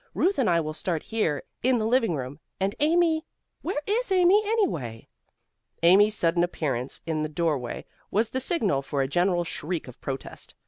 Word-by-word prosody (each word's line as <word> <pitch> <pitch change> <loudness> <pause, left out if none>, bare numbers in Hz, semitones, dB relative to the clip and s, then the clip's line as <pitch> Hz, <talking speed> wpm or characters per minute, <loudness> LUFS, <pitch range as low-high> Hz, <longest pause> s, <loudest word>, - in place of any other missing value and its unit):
Ruth 375 -3 +2
and 245 - +3
I 170 -1 +3
will 155 0 -4
start 165 0 -2
here 185 -11 -1 0.2
in 255 0 +3
the 215 - -1
living 225 -6 +2
room, 135 +1 -6 0.2
and 195 +1 0
Amy 320 +1 +3 0.4
where 345 -3 -2
is 440 +2 0
Amy, 370 +2 +5
anyway?" 160 - -1 0.8
Amy's 205 +5 +6
sudden 170 -2 +2
appearance 140 -7 -2
in 160 -1 -1
the 155 - -2
doorway 150 -7 -2 0.2
was 220 +2 +1
the 260 - -2
signal 220 - +1
for 140 0 -1
a - - -1
general 175 +4 +1
shriek 165 -1 -4
of 125 - -12
protest. 135 -1 -6
175 Hz, 175 wpm, -26 LUFS, -, 0.8 s, Amy's